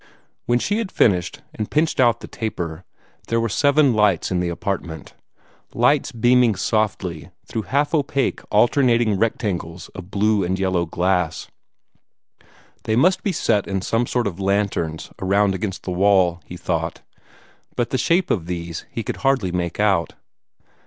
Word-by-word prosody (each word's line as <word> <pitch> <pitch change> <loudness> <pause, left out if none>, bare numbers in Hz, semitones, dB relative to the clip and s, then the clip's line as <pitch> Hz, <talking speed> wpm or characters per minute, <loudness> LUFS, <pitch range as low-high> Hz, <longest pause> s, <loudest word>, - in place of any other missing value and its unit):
When 120 +1 +3
she 205 - -1
had 215 -4 -3
finished, 90 -6 +1
and 110 - -4
pinched 155 0 +1
out 120 -3 +3
the - - -8
taper, 90 -6 -5 0.4
there 115 - +1
were 115 - 0
seven 140 +4 +3
lights 105 -6 +2
in 90 - +1
the 90 -1 -1
apartment 85 -3 -4 0.6
lights 130 +5 +2
beaming 120 -1 +3
softly 95 -5 -1 0.2
through 110 - -3
half 145 +2 +1
opaque 140 -3 0
alternating 115 -2 +3
rectangles 95 -6 -2
of 90 -2 -10
blue 105 0 +2
and 95 +2 -1
yellow 95 -3 0
glass. 90 -1 -1 1.4
They 110 - +1
must 180 +10 +3
be 200 - -1
set 105 - +1
in 95 -1 -2
some 115 +4 0
sort 125 -1 0
of 100 -2 -4
lanterns 95 -5 -1
around 100 +1 +2
against 95 0 -4
the 95 - -4
wall, 90 -2 +3
he 90 - -8
thought, 85 -2 -3 0.7
but 120 -1 -1
the 130 - 0
shape 170 +7 +2
of 85 -5 -1
these 85 -2 -5
he 115 - -4
could - - -4
hardly 135 -9 +1
make 85 0 -3
out. 100 -5 +2
100 Hz, 155 wpm, -21 LUFS, 90-120 Hz, 1.4 s, When